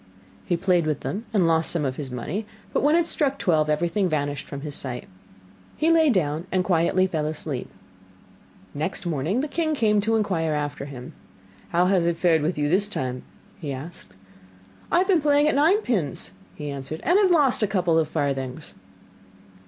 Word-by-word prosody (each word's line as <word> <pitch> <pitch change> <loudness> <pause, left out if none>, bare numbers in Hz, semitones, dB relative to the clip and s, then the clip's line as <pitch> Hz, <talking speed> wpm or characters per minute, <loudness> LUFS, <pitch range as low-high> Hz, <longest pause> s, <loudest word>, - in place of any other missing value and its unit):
He 175 - +1
played 175 -3 +2
with 150 -3 -1
them 215 +5 -4
and 200 -6 +3
lost 165 0 +2
some 160 -4 -1
of 130 -1 -2
his 140 -3 -5
money, 155 - -4 0.3
but - - +1
when 295 +3 +4
it 340 -1 +3
struck 275 -3 +2
twelve, 155 -4 +1
everything 175 +5 +1
vanished 145 -2 -2
from 140 -1 -7
his 150 0 -6
sight. 130 -3 -4 0.7
He 320 +2 +3
lay 325 -2 +5
down 165 - 0
and 185 0 +1
quietly 180 +1 +2
fell 160 -5 -2
asleep. 155 -4 -5 1.0
Next 160 +6 -3
morning 170 - 0
the 300 - -2
king 315 0 -1
came 210 -5 +2
to 225 +2 +1
inquire 180 -7 0
after 145 -1 -3
him. 130 -3 -9 0.6
'How 175 +1 +2
has 180 -2 +2
it 170 -1 0
fared 165 -3 +3
with 155 +3 -1
you 145 0 +1
this 190 +6 +3
time?' 130 -10 -3 0.4
asked 140 - -6
he. 95 - -24 0.8
'I - - +4
have 370 - +3
been 365 -6 +3
playing 290 0 +3
at 305 - +2
nine 325 +10 +4
pins,' 155 - -2 0.2
he 150 -1 -5
answered, 140 +3 -6
'and 355 +7 +4
have 395 -3 +4
lost 290 -9 +3
a 210 - +3
couple 180 -4 +2
of 155 -1 0
farthings. 135 0 -3
170 Hz, 190 wpm, -24 LUFS, 145-215 Hz, 1.0 s, lay